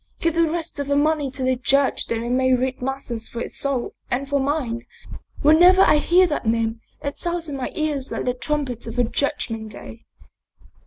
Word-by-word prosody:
give 335 -1 +1
the 335 -1 +2
rest 335 -2 -4
of 285 - -2
the 285 - +1
money 295 -1 +2
to 260 0 -5
the 255 0 +2
Church 275 +2 +1
that - - -1
they 230 +1 -3
may 260 +1 +3
read 255 +1 -2
masses 250 -3 -4
for 235 - -6
his - - -6
soul 275 -3 -1 0.2
and 270 +3 -1
for 285 0 +1
mine. 265 -4 -1 0.6
Whenever 355 +6 +7
I - - +5
hear 355 +5 +4
that 295 -9 -2
name, 225 0 0 0.2
it 285 0 -4
sounds 345 -1 -1
in 290 - -4
my 265 -2 -4
ears 295 -4 -1
like - - -3
the 250 - +1
trumpet 255 -3 -3
of 230 - -6
the 245 - +3
judg 280 +2 -1
ment 220 -1 -6
day." 225 +3 -11
275 Hz, 210 wpm, -22 LUFS, 245-300 Hz, 0.6 s, Whenever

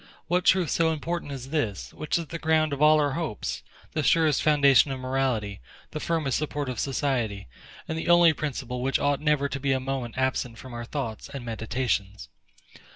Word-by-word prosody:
What 180 +1 0
truth 180 -5 +4
so 165 -1 +2
important 160 0 -3
as 135 -1 -7
this, 115 -11 -2
which 155 - -1
is 170 - -3
the 165 +2 -6
ground 155 -2 +2
of 140 - -4
all 155 0 +6
our 145 -1 +2
hopes, 155 - -3 0.3
the 155 - -1
surest 155 0 +3
foundation 145 -2 +5
of 135 -1 -4
morality, 130 -6 -1 0.3
the 155 - -4
firmest 155 -5 0
support 145 -2 -3
of 125 - -4
society, 125 - -1 0.4
and 160 - -3
the 160 - -3
only 175 -1 +7
principle 130 -4 -4
which 135 +2 +1
ought 145 0 0
never 150 -2 +2
to 140 0 -4
be 135 0 +1
a 130 - +1
moment 130 -2 -4
absent 130 -3 -1
from 130 -1 -10
our 120 0 -5
thoughts 120 -4 -5
and 135 -3 -7
meditations? 110 - -2
140 Hz, 190 wpm, -26 LUFS, 125-155 Hz, 0.4 s, only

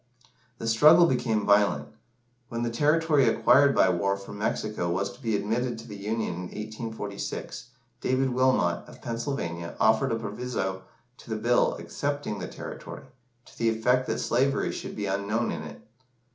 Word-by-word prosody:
The 115 - -5
struggle 150 +9 +7
became 115 -8 0
violent. 100 -8 +3 0.6
When 115 0 -3
the 120 - -1
territory 150 +2 +3
acquired 140 +2 +5
by 95 - +5
war 100 +3 0
from 100 +1 -10
Mexico 105 -4 -1
was 95 +3 -1
to 120 +2 -16
be 115 -4 0
admitted 115 +4 -1
to 115 - -10
the 105 - -8
Union 105 0 -2
in 85 - -5
1846, 110 +1 -6 0.3
David 130 0 +1
Wilmot, 125 -9 +2
of - - -13
Pennsylvania, 115 - -4
offered 110 +4 +3
a - - +1
proviso 105 -3 -3 0.4
to - - -15
the 110 - -1
Bill 120 +3 +2
accepting 145 -7 -3
the 90 - -4
territory, - - -8 0.4
to - - -18
the 115 - +1
effect 125 +3 +1
that - - -1
slavery 135 +3 +1
should - - -6
be 105 - -3
unknown 100 +4 -1
in - - -4
it. 75 -2 -10
110 Hz, 160 wpm, -27 LUFS, 100-125 Hz, 0.6 s, struggle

